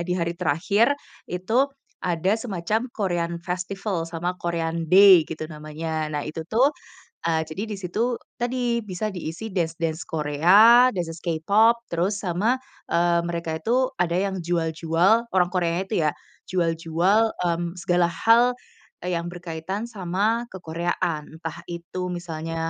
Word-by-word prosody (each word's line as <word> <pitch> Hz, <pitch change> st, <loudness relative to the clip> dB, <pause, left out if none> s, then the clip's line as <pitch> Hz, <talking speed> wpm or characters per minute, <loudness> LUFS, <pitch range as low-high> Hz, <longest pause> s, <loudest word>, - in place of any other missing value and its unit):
Di -, -, +1 dB
hari 170 Hz, -1 st, -1 dB
terakhir, 185 Hz, -, +2 dB, 0.4 s
itu 220 Hz, +10 st, +1 dB, 0.4 s
ada 180 Hz, +2 st, +1 dB
semacam 220 Hz, +1 st, -2 dB
Korean 175 Hz, -6 st, -1 dB
Festival, 180 Hz, +1 st, -3 dB
sama 175 Hz, +2 st, -3 dB
Korean 165 Hz, -1 st, -2 dB
Day 185 Hz, -2 st, +8 dB
gitu 155 Hz, -1 st, -5 dB
namanya. 155 Hz, 0 st, -4 dB
Nah 145 Hz, -1 st, -2 dB
itu 160 Hz, +1 st, -5 dB
tuh, 245 Hz, +5 st, +5 dB, 0.6 s
eee, 160 Hz, -1 st, +2 dB
jadi 170 Hz, +6 st, -5 dB
di -, -, -2 dB
situ, 220 Hz, +7 st, -1 dB, 0.2 s
tadi, 240 Hz, -1 st, 0 dB
bisa 200 Hz, +2 st, -3 dB
diisi 180 Hz, +4 st, -6 dB
dance 170 Hz, -4 st, -1 dB
dance 160 Hz, 0 st, -1 dB
Korea, 180 Hz, -, +6 dB
dance-dance 170 Hz, -3 st, -4 dB
K-Pop, 200 Hz, +8 st, +4 dB, 0.2 s
terus 185 Hz, +5 st, 0 dB
sama, 195 Hz, +5 st, +1 dB, 0.4 s
eee, 170 Hz, 0 st, +3 dB
mereka 170 Hz, -2 st, -3 dB
itu 255 Hz, +8 st, +1 dB
ada 170 Hz, -1 st, +1 dB
yang 190 Hz, +1 st, 0 dB
jual-jual, 170 Hz, +6 st, +2 dB
orang 180 Hz, -2 st, +3 dB
Koreanya 175 Hz, -1 st, 0 dB
itu 220 Hz, -, -1 dB
ya, -, -, +2 dB, 0.4 s
jual-jual, 175 Hz, +5 st, +2 dB
mmm, 170 Hz, 0 st, -1 dB
segala 175 Hz, 0 st, +2 dB
hal 230 Hz, +7 st, +4 dB, 0.5 s
yang 170 Hz, -2 st, -1 dB
berkaitan 175 Hz, +4 st, -5 dB
sama 210 Hz, +3 st, 0 dB
kekoreaan. 165 Hz, -3 st, -3 dB
Entah 160 Hz, -2 st, -6 dB
itu 175 Hz, +2 st, -5 dB
misalnya 165 Hz, -2 st, -4 dB
175 Hz, 135 wpm, -24 LUFS, 165-200 Hz, 0.6 s, Day